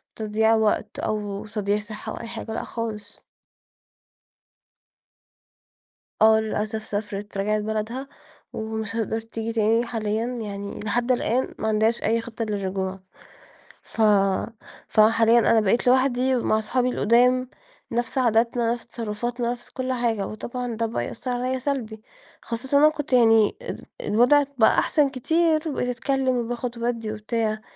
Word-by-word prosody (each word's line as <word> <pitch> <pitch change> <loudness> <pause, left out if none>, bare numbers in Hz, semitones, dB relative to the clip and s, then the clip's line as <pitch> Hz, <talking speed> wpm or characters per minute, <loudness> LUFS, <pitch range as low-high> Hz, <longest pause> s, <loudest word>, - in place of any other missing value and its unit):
تضييع 220 +1 +2
وقت، 220 -1 0
أو 210 -1 -3
تضييع 210 -1 -1
صحّة، 210 0 -7
أو - - -6
أي 230 - -7
حاجة، 225 0 -6
لأ - - -3
خالص. 215 -3 -6 3.0
آه، 220 0 +6
للأسف 215 0 -3
سافرت، 205 -1 -4
رجعت 210 +2 0
بلدها، 220 +5 -3 0.4
ومش 220 0 -4
هتقدر 225 0 -1
تيجي 225 0 -5
تاني 225 +1 +2
حاليًا، 220 -1 -2
يعني 205 -5 -5
لحد 240 +4 0
الآن 250 +1 0
ما 220 - -1
عندهاش 220 +2 +1
أي 230 +1 +1
خطّة 230 0 -5
للرجوع، 190 -1 -3 0.8
ف - - -6 0.9
فحاليًا 225 +2 +5
أنا 230 -1 +4
بقيت 220 +4 +1
لوحدي 260 0 +3
مع 225 -3 +1
أصحابي 245 +4 0
القدام، 250 +2 +3 0.4
نفس 240 +3 -2
عاداتنا، 235 -1 +2
نفس 240 - -8
تصرفاتنا، 235 +2 -3
نفس 240 0 -8
كل 260 0 -3
حاجة، 230 -5 0
وطبعًا 240 +2 -5
ده 230 +1 -1
بقى 225 - -2
يأثر 255 - -5
عليَّا 255 +1 -1
سلبي، 240 -5 -3 0.4
خاصةً 260 +4 -1
وأنا 300 +2 +7
كنت 295 -4 -5
يعني 225 - +5
ال - - -7 0.2
الوضع 250 +7 +4
بقى 220 - +5
أحسن 295 -3 +2
كتير، 315 +4 +1
وبقيت 250 -3 -2
أتكلِّم، 260 +1 0
وباخد 240 0 -3
وبادِّي 235 -2 -2
وبتاع، 215 0 -2
230 Hz, 135 wpm, -24 LUFS, 215-245 Hz, 3.0 s, وأنا